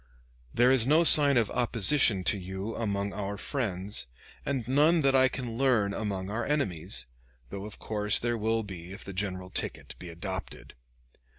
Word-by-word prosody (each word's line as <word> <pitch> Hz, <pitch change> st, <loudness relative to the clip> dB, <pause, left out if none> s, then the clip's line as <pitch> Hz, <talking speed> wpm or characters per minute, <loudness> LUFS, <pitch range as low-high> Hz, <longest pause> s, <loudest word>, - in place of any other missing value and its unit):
There 120 Hz, -, +3 dB
is 130 Hz, -3 st, +3 dB
no 155 Hz, +4 st, +4 dB
sign 145 Hz, -4 st, +8 dB
of 115 Hz, -3 st, +1 dB
opposition 120 Hz, -3 st, +2 dB
to 100 Hz, -, 0 dB
you 95 Hz, +4 st, -6 dB
among 100 Hz, -3 st, -3 dB
our 100 Hz, 0 st, -5 dB
friends, 100 Hz, -, -2 dB, 0.4 s
and 130 Hz, -5 st, -3 dB
none 150 Hz, +6 st, +3 dB
that 135 Hz, -1 st, +3 dB
I 130 Hz, 0 st, +5 dB
can 120 Hz, -3 st, -6 dB
learn 115 Hz, -7 st, +2 dB
among 100 Hz, -2 st, -4 dB
our 115 Hz, +3 st, -2 dB
enemies; 100 Hz, -, -1 dB, 0.5 s
though 100 Hz, 0 st, -6 dB
of 105 Hz, -, -9 dB
course 105 Hz, -1 st, 0 dB
there 120 Hz, 0 st, -1 dB
will 110 Hz, +1 st, 0 dB
be 90 Hz, -3 st, -9 dB
if 100 Hz, -, -9 dB
the 100 Hz, -, -8 dB
general 95 Hz, -1 st, -4 dB
ticket -, -, -4 dB
be 90 Hz, -, -9 dB
adopted. 95 Hz, +3 st, -7 dB
105 Hz, 170 wpm, -28 LUFS, 95-130 Hz, 0.5 s, sign